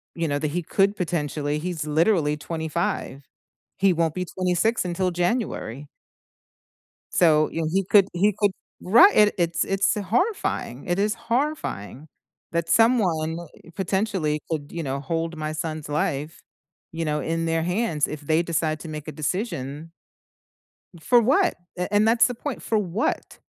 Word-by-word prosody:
you 165 -1 -1
know, 145 0 0
that 150 -1 -2
he 175 +2 -2
could 200 +4 +2
potentially 150 -4 -2
he's 165 -2 -3
literally 155 -1 +2
25. 160 -3 -3 0.5
He 195 -1 +4
won't 165 -2 0
be 180 0 -2
26 185 +5 0
until 180 +1 0
January. 175 - -2 1.2
So, 155 -3 +4
you 165 - -3
know, 155 - 0
he 195 +1 +2
could 195 +1 +5
he 200 +4 +2
could 205 -2 +2 0.3
Right, 335 - +7
it 210 -1 +5
it's 170 -1 +1
it's 195 +1 +1
horrifying, 215 - -1
it 175 - 0
is 210 +2 +1
horrifying 230 - -3 0.4
that 170 0 -1
someone, 180 -9 +3 0.4
potentially, 190 -5 0
could, 150 -3 -3
you 170 - -4
know, 135 -2 -2
hold 165 +4 -3
my 155 0 -3
son's 155 -1 -4
life, 145 +1 -2 0.5
you 165 0 -3
know, 150 -1 -1
in 165 0 -2
their 165 0 0
hands 180 -3 0
if 150 -1 -6
they 155 +3 +2
decide 160 -2 -1
to 165 - -8
make 155 -1 -6
a 155 - -5
decision 155 - -4 1.1
for 240 +10 +4
what, 295 - +3 0.2
a 180 +3 -3
and 210 +1 +4
that's 230 +1 +5
the 245 - -3
point, 275 +2 -5
for 220 - 0
what? 200 +2 -2
170 Hz, 155 wpm, -24 LUFS, 155-200 Hz, 1.2 s, Right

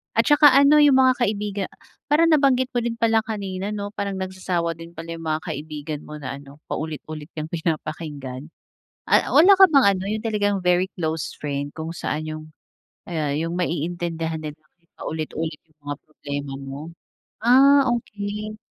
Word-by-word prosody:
At - - +4
saka 295 0 +8
ano, 280 +2 +7
'yong 290 -3 +6
mga 260 -1 +5
kaibiga 205 -3 -1 0.4
parang 325 +2 +4
nabanggit 265 -4 +3
mo 245 - 0
din 235 0 -2
pala 225 -1 +3
kanina, 200 -4 -4
'no, 205 0 -4
parang 200 -2 -3
nagsasawa 185 -3 -2
din 165 +1 -10
pala 165 +1 -7
'yong 165 -1 -7
mga 155 0 0
kaibigan 155 -2 -5
mo 150 - -8
na 140 -1 -6
ano, 140 0 -14 0.2
paulit-ulit 155 -1 -5
kang 155 0 -5
pinapakinggan. 155 -4 -4 0.6
A - - +5
wala 370 +6 +8
ka 385 - +11
bang 275 -5 +6
ano, 185 - -5
'yong 215 +2 -2
talagang 205 -2 +1
very 180 +1 +3
close 160 -3 -3
friend 145 -1 -3
kung 160 +1 -5
saan 155 -2 -3
'yong 155 0 -6 0.7
ayan, 155 -4 -1
'yong 165 +1 -3
maiintindihan 165 -1 -2
nila 150 -1 -6
kahit 170 +2 -39
paulit-ulit 155 0 -4
'yong 155 -1 -35
mga 145 -1 -4
problema 145 -2 -6
mo? 135 +1 -7 0.6
Ah, 275 +3 +6
okay. 210 -1 -6
170 Hz, 165 wpm, -23 LUFS, 155-215 Hz, 0.7 s, ka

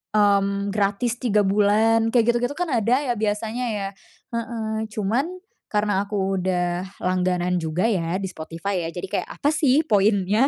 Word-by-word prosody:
mmm, 200 -1 +2
gratis 210 +4 0
3 210 -4 +2
bulan, 215 +3 +3
kayak 240 -1 +4
gitu-gitu 245 +4 -1
kan 355 -2 -1
ada 240 +4 +2
ya 245 -3 0
biasanya 220 +3 -1
ya? 200 -2 -2 0.5
Heeh, 220 -1 -3
cuman 220 - 0 0.4
karena 205 -2 +1
aku 195 -2 -1
udah 180 -1 0 0.2
langganan 180 -1 +1
juga 160 +2 -2
ya 180 -4 0
di 195 - -3
Spotify 170 +2 -4
ya - - -4
jadi 185 +2 -4
kayak, - - -1
"Apa 290 - +2
sih 295 0 +3
poinnya?" 205 +3 +3
205 Hz, 155 wpm, -23 LUFS, 190-225 Hz, 0.5 s, kayak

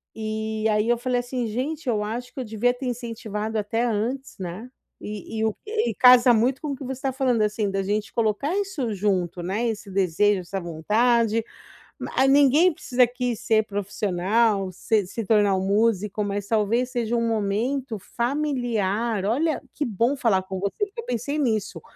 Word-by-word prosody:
e 220 0 -3
aí 210 +1 +1
eu 240 - +3
falei 250 +1 0
assim: 245 0 -3
"Gente, 270 +6 -3
eu 210 -3 +1
acho 240 +4 -5
que - - -7
eu - - -3
devia 225 +3 +1
ter 255 +2 -7
incentivado 225 -3 -4
até 220 +3 -1
antes", 240 +4 -2
né. 185 +7 -6 0.3
E 210 +1 -6
e 220 - +1
o 220 - 0
e 430 - 0
e - - -10
casa 250 +1 +7
muito 245 +4 +1
com 300 - -4
o - - -4
que 270 - -9
você 265 - -3
estava 265 0 -3
falando, 250 -5 +2
assim, 210 -1 0
da 195 0 0
gente 205 +2 -2
colocar 230 - 0
isso 360 - -2
junto, 185 -3 -1
né, 205 +7 -1
esse 215 -2 -4
desejo, 195 +1 +2
essa 195 +2 -5
vontade, 220 +7 +1 0.6
ma 265 - +1
ninguém 290 +5 +5
precisa 255 -4 +2
aqui 245 0 -1
ser 220 -1 +1
profissional, 200 0 0
se 205 +3 0
se 225 +3 -5
tornar 205 -2 +3
um 190 - -2
músico, 210 0 +1
mas 200 0 -3
talvez 230 +4 +1
seja 240 -1 -1
um 230 0 +1
momento 225 +3 -1
familiar. 235 -5 -1
Olha, 290 +8 +1
que 295 - -2
bom 235 +5 +1
falar 210 -8 +2
com 190 0 -5
você, 200 - -1
porque 425 +3 -8
eu - - -14
pensei 245 - -2
nisso 215 - -1
225 Hz, 185 wpm, -24 LUFS, 205-250 Hz, 0.6 s, casa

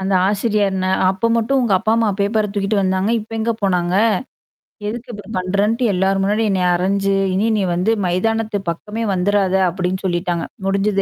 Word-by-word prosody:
அந்த 190 +1 -1 0.2
ஆசிரியர்ன. 200 -2 0 0.2
அப்ப 195 +4 -1
மட்டும் 230 +4 +1
உங்க 235 -4 +1
அப்பா, 215 +4 0
அம்மா 230 -1 +2
பேப்பர 210 +1 +1
தூக்கிட்டு 200 +1 0
வந்தாங்க. 190 +2 0
இப்ப 220 +2 -9
எங்க 225 +1 0
போனாங்க? 180 -2 +1 0.9
எதுக்கு 235 +3 -6
இப்படி 205 +1 -8
பண்றன்ட்டு 200 +6 0
எல்லார் 190 +1 +1
முன்னாடி 210 +3 +1
என்ன 190 -2 +1
அரைஞ்சு, 195 +2 0 0.2
இனி 200 +4 +1
நீ 200 - 0
வந்து 180 +6 +1 0.2
மைதானத்து 215 +4 0
பக்கமே 210 +7 -4
வந்துறாத 190 +1 +1
அப்படின்னு 185 +1 -2
சொல்லிட்டாங்க. 175 -1 -1 0.2
முடிஞ்சுது 195 +1 +1
200 Hz, 160 wpm, -19 LUFS, 185-215 Hz, 0.9 s, அம்மா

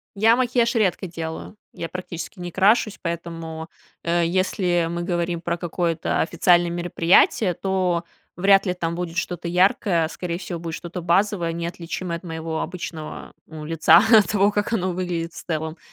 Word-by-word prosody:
Я 225 +3 +5
макияж 245 -1 +1
редко 195 -3 +1
делаю, 165 +3 -6 0.2
я 165 - -5
практически 180 +1 -7
не 175 0 -5
крашусь, 205 +3 +3
поэтому, 165 -1 -5 0.3
э, 170 0 +1
если 180 -1 +1
мы 170 0 -3
говорим 175 -1 -1
про 170 0 -2
какое-то 170 -1 -1
официальное 175 +1 +3
мероприятие, 175 +3 +3
то 185 -2 0 0.3
вряд 195 +2 +4
ли 180 - 0
там 170 -2 -3
будет 175 -1 -4
что-то 175 -1 -3
яркое, 180 -1 +2
скорее 170 -1 -4
всего 175 -1 -6
будет 165 -1 -5
что-то 175 +1 -7
базовое, 175 0 +1
неотличимое 170 0 -4
от 170 - -17
моего 160 -2 -4
обычного, 165 -2 -7
ну, 155 -1 -9
лица, 165 0 +6 0.2
от 210 - +4
того, 205 -1 +3
как 205 +2 -1
оно 185 -4 0
выглядит 175 -2 -3
в - - -9
целом. 160 0 -3
175 Hz, 160 wpm, -23 LUFS, 165-185 Hz, 0.3 s, лица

